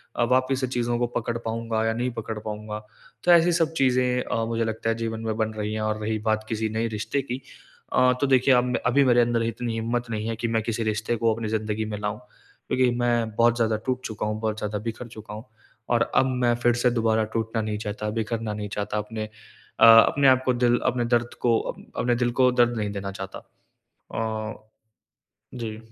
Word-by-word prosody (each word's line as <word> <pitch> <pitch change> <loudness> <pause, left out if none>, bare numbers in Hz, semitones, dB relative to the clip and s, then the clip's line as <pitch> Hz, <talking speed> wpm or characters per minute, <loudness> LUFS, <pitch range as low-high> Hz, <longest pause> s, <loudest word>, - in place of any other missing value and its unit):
अ, - - +2
वापस 130 +1 +2
से 130 - 0
चीज़ों 120 -1 -1
को 120 - +1
पकड़ 120 0 -2
पाऊँगा 115 -1 -2
या 115 - +1
नहीं 125 +2 -1
पकड़ 110 -1 -5
पाऊँगा? 105 0 -5 0.4
तो 175 - +4
ऐसी 170 0 +6
सब 165 -1 +1
चीज़ें 125 -1 +2
अ, 115 - -1
मुझे 115 0 -1
लगता 110 0 -2
है 115 - +1
जीवन 115 -1 -3
में 110 -1 -1
बन 110 -1 -1
रही 105 0 -3
है। 110 - -2
और 110 0 -1
रही 110 +1 -1
बात 110 0 +1
किसी 110 0 -1
नए 110 +2 -1
रिश्ते 110 +5 -2
की 130 0 -5 0.5
अ, 125 0 +5
तो 140 - +3
देखिए 130 0 +4
अब 125 -1 +2
अभी 130 +3 +4
मेरे 120 -1 +5
अंदर 120 -1 +1
इतनी 115 +1 -3
हिम्मत 115 +2 -2
नहीं 110 -1 -3
है 115 - -2
कि 115 +2 -2
मैं 115 -1 +1
किसी 115 +1 -2
रिश्ते 110 +2 -1
को 115 0 +2
अपनी 115 0 -4
ज़िन्दगी 110 0 -1
में 105 -1 -4
लाऊँ। 105 0 -3 0.5
क्योंकि 130 -1 +2
मैं 120 -2 +1
बहुत 115 +1 +4
ज़्यादा 115 -2 +1
टूट 130 -1 -1
चुका 110 -1 -4
हूँ, 105 0 -2
बहुत 110 -1 -2
ज़्यादा 105 -1 -3
बिखर 115 +2 -5
चुका 110 -2 -10
हूँ 110 +3 -8 0.4
और 120 -1 +2
अब - - +5 0.2
मैं 120 -1 +4
फिर 120 - +5
से 120 +1 +3
दोबारा 110 -2 +2
टूटना 115 0 -1
नहीं 105 -1 -2
चाहता, 105 0 -4
बिखरना 110 0 -2
नहीं 105 0 -5
चाहता 105 +1 -3
अपने 110 +1 -4 0.5
अ, - - +8
अपने 115 +5 +7
आपको 130 -1 +4
दिल 120 -1 +2
अपने 125 -2 +1
दर्द 120 0 -1
को 115 -2 +3
अ, - - -4 0.3
अपने 120 0 +2
दिल 120 0 +1
को 125 0 +6
दर्द 120 -1 +2
नहीं 105 -2 -2
देना 100 -1 -4
चाहता। 95 -1 -7 0.8
अ, 110 -1 -2 1.0
जी। 115 -3 -5
115 Hz, 215 wpm, -25 LUFS, 110-120 Hz, 1.0 s, अ